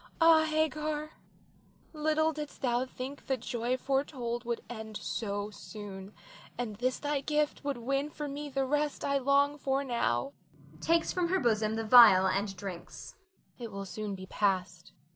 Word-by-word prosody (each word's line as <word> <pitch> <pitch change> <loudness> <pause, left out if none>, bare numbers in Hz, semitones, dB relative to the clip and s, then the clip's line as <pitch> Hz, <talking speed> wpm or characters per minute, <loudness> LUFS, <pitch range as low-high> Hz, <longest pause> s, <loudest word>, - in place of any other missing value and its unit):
Ah, 325 -1 +6
Hagar, 310 0 -1 0.8
little 315 +1 +1
didst 300 -1 -7
thou 245 0 +1
think 260 +2 -7
the 265 - +1
joy 240 +1 -2
foretold 260 -3 -2
would 235 -1 -2
end 220 -3 -6
so 205 -2 -3
soon, 200 -2 -9 0.4
and 225 -4 -4
this 255 +3 0
thy 290 -1 -1
gift 300 +1 0
would 280 -2 -2
win 275 +4 -1
for 300 -1 -5
me 290 +1 -5
the 270 -1 0
rest 295 +2 -1
I 280 0 +2
long 280 +2 +2
for 270 0 0
now 140 - 0 0.5
[takes 335 - +2
from 360 -2 +1
her 375 +2 +1
bosom 220 -3 +1
the 225 0 -3
phial 215 -6 +9
and 195 +1 0
drinks]. 180 -3 -8 0.5
It 230 -2 -6
will 200 0 -5
soon 205 +1 -5
be 185 0 -8
past. 185 -3 -1
255 Hz, 160 wpm, -31 LUFS, 215-295 Hz, 0.8 s, phial